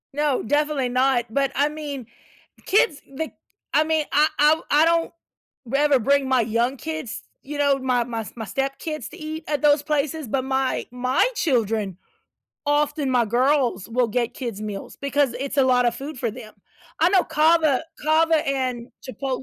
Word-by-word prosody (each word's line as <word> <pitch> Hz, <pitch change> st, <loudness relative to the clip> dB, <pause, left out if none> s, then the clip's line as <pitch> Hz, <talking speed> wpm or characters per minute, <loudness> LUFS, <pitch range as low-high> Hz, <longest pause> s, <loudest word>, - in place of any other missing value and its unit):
No, 295 Hz, -2 st, 0 dB
definitely 290 Hz, 0 st, 0 dB
not, 255 Hz, -1 st, +2 dB
but, 275 Hz, +3 st, 0 dB
I 290 Hz, +2 st, +2 dB
mean, 295 Hz, -4 st, -6 dB, 0.6 s
kids, 390 Hz, -6 st, +2 dB
the 300 Hz, +4 st, -5 dB, 0.5 s
I 305 Hz, -, +5 dB
mean, 315 Hz, -1 st, 0 dB
I 300 Hz, +1 st, +5 dB
I 295 Hz, +1 st, +6 dB
w 315 Hz, +1 st, 0 dB
I 300 Hz, +2 st, +5 dB
don't 335 Hz, 0 st, +2 dB, 0.5 s
rather 275 Hz, +2 st, +3 dB
bring 280 Hz, +3 st, +2 dB
my 260 Hz, -2 st, +4 dB
young 235 Hz, +4 st, 0 dB
kids, 315 Hz, -5 st, -5 dB, 0.2 s
you 295 Hz, +2 st, -7 dB
know, 285 Hz, -1 st, +3 dB
my 250 Hz, -2 st, +1 dB
my 230 Hz, -1 st, -4 dB
s 210 Hz, -, -9 dB
my 225 Hz, -2 st, -5 dB
step 270 Hz, +5 st, -2 dB
kids 305 Hz, -7 st, -5 dB
to 340 Hz, -, -12 dB
eat 315 Hz, -1 st, -6 dB
at 295 Hz, -2 st, -1 dB
those 295 Hz, -1 st, +4 dB
places, 300 Hz, -1 st, -1 dB
but 260 Hz, +4 st, -1 dB
my 265 Hz, -1 st, 0 dB
my 255 Hz, -, +1 dB
children, 220 Hz, -, 0 dB, 0.7 s
often 290 Hz, -1 st, +1 dB
my 245 Hz, -2 st, +3 dB
girls 245 Hz, -3 st, +1 dB
will 240 Hz, +1 st, +1 dB
get 235 Hz, +1 st, -1 dB
kids 235 Hz, -6 st, -5 dB
meals 210 Hz, -2 st, -6 dB
because 280 Hz, -2 st, +1 dB
it's 275 Hz, +2 st, -4 dB
a 270 Hz, -, +5 dB
lot 250 Hz, -1 st, +3 dB
of 240 Hz, -, +1 dB
food 280 Hz, 0 st, -7 dB
for 235 Hz, -2 st, -1 dB
them. 220 Hz, -1 st, -11 dB, 0.4 s
I -, -, +4 dB
know 380 Hz, -3 st, +4 dB
CAVA 310 Hz, -3 st, +3 dB, 0.2 s
CAVA 315 Hz, 0 st, +3 dB
and 255 Hz, -3 st, -2 dB, 0.2 s
Chipotle 260 Hz, +1 st, -4 dB
275 Hz, 180 wpm, -23 LUFS, 245-300 Hz, 0.7 s, I